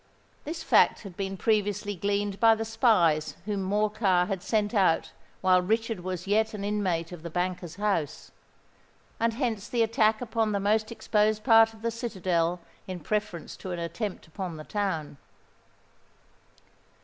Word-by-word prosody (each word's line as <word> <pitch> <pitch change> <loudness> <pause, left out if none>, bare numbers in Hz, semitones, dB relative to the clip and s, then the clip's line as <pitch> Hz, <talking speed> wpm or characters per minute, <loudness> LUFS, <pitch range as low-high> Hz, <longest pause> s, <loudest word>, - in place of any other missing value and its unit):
This 320 +3 -5
fact - - +4
had 195 -4 -9
been 195 0 -4
previously 205 -1 0
gleaned 200 +1 -1
by 225 -1 +6
the 225 0 -3
spies 185 - +2
whom 205 -2 -2
Morcar 205 -2 +2
had 190 -1 -3
sent 210 +1 0
out 190 -6 +2 0.3
while 185 -1 +4
Richard 225 +2 -1
was 180 0 -5
yet 215 +2 +1
an 200 - -5
inmate 185 -5 -1
of 175 -3 -8
the 170 - -6
banker's 180 -1 -3
house; 200 -7 -2 0.9
and 230 0 +1
hence 230 -6 -2
the 235 -2 +2
attack 220 -1 +2
upon 225 -3 -1
the 200 - +1
most 215 +3 +1
exposed 215 -1 +1
part 225 -2 +6
of 220 - -17
the 230 - 0
citadel 185 -7 -1 0.3
in 185 -1 -5
preference 210 0 -3
to 185 - -8
an - - -4
attempt 175 +4 -4
upon 170 0 -6
the 155 - -8
town. 165 -7 -3
205 Hz, 155 wpm, -27 LUFS, 180-220 Hz, 0.9 s, by